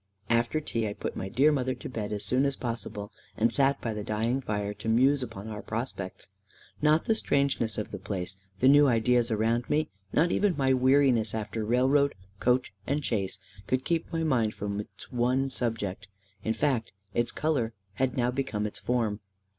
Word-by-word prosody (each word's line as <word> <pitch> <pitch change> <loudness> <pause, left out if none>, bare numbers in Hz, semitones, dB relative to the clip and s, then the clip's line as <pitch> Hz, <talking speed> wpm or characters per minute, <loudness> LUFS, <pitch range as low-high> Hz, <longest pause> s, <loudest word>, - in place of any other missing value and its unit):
After 120 +6 +2
tea, 115 -7 -2
I 100 - -3
put - - -5
my 95 - -4
dear 135 +8 +4
mother 130 -3 0
to - - -8
bed 110 -4 -4
as 105 -1 -1
soon 130 +7 +2
as 140 - -2
possible, 110 -4 -5 0.3
and 115 +2 +2
sat 140 0 +3
by 115 - -2
the 105 -1 -4
dying 115 +5 0
fire 105 -3 -2
to 105 +2 -5
muse 130 +5 +4
upon 110 -4 -6
our 105 -1 -5
prospects. 110 -5 -4 0.6
Not 155 +2 +4
the 225 - +3
strangeness 140 - +1
of 105 - -3
the - - -5
place, 95 -1 -3 0.3
the 130 - +5
new 145 +1 +7
ideas 120 0 +3
around 115 +2 +1
me, 150 -5 +1 0.2
not 170 +3 +3
even 200 -6 +2
my 135 -2 +3
weariness 130 -4 +3
after 110 0 -3
railroad, 130 +5 +3 0.2
coach, 125 +1 +2
and 145 +2 0
chaise, 100 -4 -1 0.3
could 130 +4 0
keep 165 -1 -1
my 165 -1 -1
mind 120 -8 +1
from 100 0 -3
its 105 - -9
one 130 +2 +1
subject. 105 -6 -2 0.4
In 110 - 0
fact, 130 -6 0 0.2
its 120 0 0
colour 135 -8 0 0.2
had 130 +4 -1
now 125 0 +2
become 125 -5 -2
its 105 - -5
form. 115 -4 0
120 Hz, 185 wpm, -28 LUFS, 110-135 Hz, 0.6 s, new